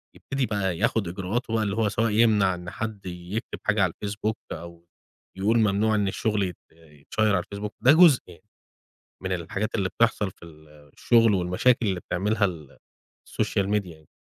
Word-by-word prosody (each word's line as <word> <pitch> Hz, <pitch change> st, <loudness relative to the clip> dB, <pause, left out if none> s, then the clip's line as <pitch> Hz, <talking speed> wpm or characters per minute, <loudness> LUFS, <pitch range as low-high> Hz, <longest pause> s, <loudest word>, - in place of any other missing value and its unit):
يبتدي 135 Hz, -1 st, -2 dB
بقى 95 Hz, -6 st, -1 dB
ياخد 105 Hz, +2 st, +1 dB
إجراءات 95 Hz, +7 st, -3 dB
هو 115 Hz, -1 st, +1 dB
اللي 100 Hz, -1 st, -2 dB
هو 110 Hz, -2 st, +1 dB
سواء 110 Hz, +2 st, 0 dB
يمنع 105 Hz, -3 st, +4 dB
إن 90 Hz, 0 st, -8 dB
حد 110 Hz, 0 st, -6 dB
يكتب 90 Hz, +4 st, -6 dB
حاجة 110 Hz, -2 st, +2 dB
على 90 Hz, -3 st, 0 dB
الFacebook 105 Hz, +1 st, -3 dB, 0.2 s
أو 85 Hz, +1 st, -9 dB, 0.5 s
يقول 110 Hz, +4 st, +2 dB
ممنوع 110 Hz, 0 st, +2 dB
إن 105 Hz, -2 st, +1 dB
الشغل 105 Hz, +1 st, 0 dB
يت 90 Hz, -3 st, -4 dB
يتشيّر 80 Hz, +7 st, -2 dB
على 90 Hz, -, 0 dB
الFacebook. 105 Hz, +1 st, -4 dB
ده 130 Hz, -, +6 dB
جزء 160 Hz, -4 st, +7 dB
يعني 90 Hz, -, -15 dB, 0.8 s
من 95 Hz, -, -3 dB
الحاجات 95 Hz, +5 st, -3 dB
اللي 95 Hz, -4 st, 0 dB
بتحصل 110 Hz, -3 st, +1 dB
في 85 Hz, -, -15 dB
ال 80 Hz, -2 st, -16 dB, 0.3 s
الشغل 115 Hz, -2 st, +4 dB
والمشاكل 100 Hz, +7 st, +2 dB
اللي 95 Hz, -2 st, -1 dB
بتعملها 100 Hz, +5 st, 0 dB
ال 80 Hz, -7 st, -7 dB, 0.5 s
الSocial 100 Hz, -1 st, -1 dB
Media 105 Hz, -1 st, 0 dB
يعني. 80 Hz, -3 st, -14 dB
100 Hz, 175 wpm, -25 LUFS, 90-110 Hz, 0.8 s, جزء